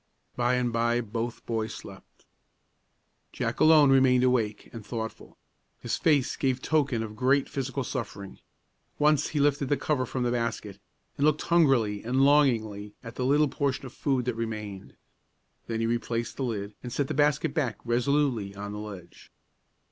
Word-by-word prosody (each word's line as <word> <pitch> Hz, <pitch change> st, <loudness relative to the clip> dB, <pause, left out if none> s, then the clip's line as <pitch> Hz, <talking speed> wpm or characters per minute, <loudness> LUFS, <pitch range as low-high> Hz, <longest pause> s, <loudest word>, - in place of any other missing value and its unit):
By 120 Hz, +1 st, +1 dB
and 125 Hz, -2 st, 0 dB
by 120 Hz, +1 st, +1 dB
both 115 Hz, +1 st, -4 dB
boys 110 Hz, -1 st, -2 dB
slept. -, -, -13 dB, 1.1 s
Jack -, -, -3 dB
alone 155 Hz, -3 st, +6 dB
remained 130 Hz, -2 st, +5 dB
awake 115 Hz, -5 st, 0 dB
and 115 Hz, -2 st, -8 dB
thoughtful. 110 Hz, +1 st, -6 dB, 0.4 s
His -, -, -2 dB
face 145 Hz, -6 st, +2 dB
gave 130 Hz, -1 st, 0 dB
token 140 Hz, -5 st, 0 dB
of 110 Hz, -1 st, -7 dB
great 130 Hz, +4 st, +2 dB
physical 135 Hz, 0 st, -3 dB
suffering. 100 Hz, -7 st, -6 dB, 0.6 s
Once 150 Hz, -1 st, +3 dB
he 150 Hz, -, -2 dB
lifted 140 Hz, -1 st, +2 dB
the 145 Hz, -, +2 dB
cover 130 Hz, -5 st, -1 dB
from 125 Hz, +1 st, -2 dB
the 120 Hz, -, 0 dB
basket, 115 Hz, -4 st, -3 dB, 0.4 s
and 140 Hz, -, +3 dB
looked 155 Hz, 0 st, +1 dB
hungrily 135 Hz, -12 st, +2 dB
and 125 Hz, +4 st, +1 dB
longingly 110 Hz, -8 st, +2 dB
at 115 Hz, -1 st, -8 dB
the 125 Hz, -, -3 dB
little 145 Hz, +3 st, +4 dB
portion 140 Hz, 0 st, -2 dB
of 130 Hz, -, -9 dB
food 135 Hz, -4 st, -1 dB
that 125 Hz, -, 0 dB
remained. 105 Hz, -4 st, -6 dB, 0.7 s
Then 115 Hz, -1 st, -2 dB
he -, -, +1 dB
replaced 115 Hz, 0 st, -2 dB
the 135 Hz, -, -1 dB
lid, 105 Hz, -3 st, -4 dB
and 125 Hz, -, -7 dB
set 135 Hz, +3 st, -1 dB
the -, -, -3 dB
basket 150 Hz, +1 st, +2 dB
back 125 Hz, -10 st, -1 dB
resolutely 120 Hz, -4 st, 0 dB
on 100 Hz, +1 st, -6 dB
the 105 Hz, -, -6 dB
ledge. 100 Hz, -5 st, -10 dB
125 Hz, 165 wpm, -27 LUFS, 110-140 Hz, 1.1 s, alone